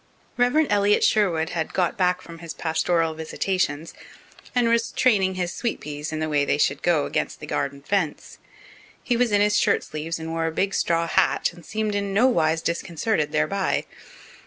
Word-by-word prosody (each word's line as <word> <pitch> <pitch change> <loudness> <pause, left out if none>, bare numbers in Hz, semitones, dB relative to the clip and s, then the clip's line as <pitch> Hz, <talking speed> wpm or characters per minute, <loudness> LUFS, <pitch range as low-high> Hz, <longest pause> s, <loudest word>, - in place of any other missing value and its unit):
Rev. 250 +5 +3
Elliott 205 0 +3
Sherwood 170 -6 +2
had 165 -2 -3
got 180 -3 +1
back 180 -1 +1
from 165 -1 -11
his 165 -1 -8
pastoral 165 0 0
visitations, 160 -1 -2 0.6
and 245 -1 +3
was 230 0 +1
training 195 -7 +2
his 180 -1 -2
sweet 235 - -2
peas 150 +1 -6
in 155 - -3
the 155 - -1
way 145 -2 +1
they 145 - +1
should 140 -1 +1
go 165 -5 +2
against - - -2
the - - -7
garden 140 0 -3
fence. 180 -4 -2 0.6
He 245 - +1
was 240 -1 +2
in 205 0 +3
his 210 0 +3
shirt - - +2
sleeves 155 +2 -4
and 160 0 -6
wore 165 0 -1
a - - -1
big 195 +4 -1
straw 170 0 +1
hat, 165 - +1
and 170 0 -15
seemed 215 +3 -2
in 200 -1 -2
nowise 165 -9 +3
disconcerted 170 -1 -1
thereby. 75 - 0
170 Hz, 180 wpm, -24 LUFS, 160-205 Hz, 0.6 s, Rev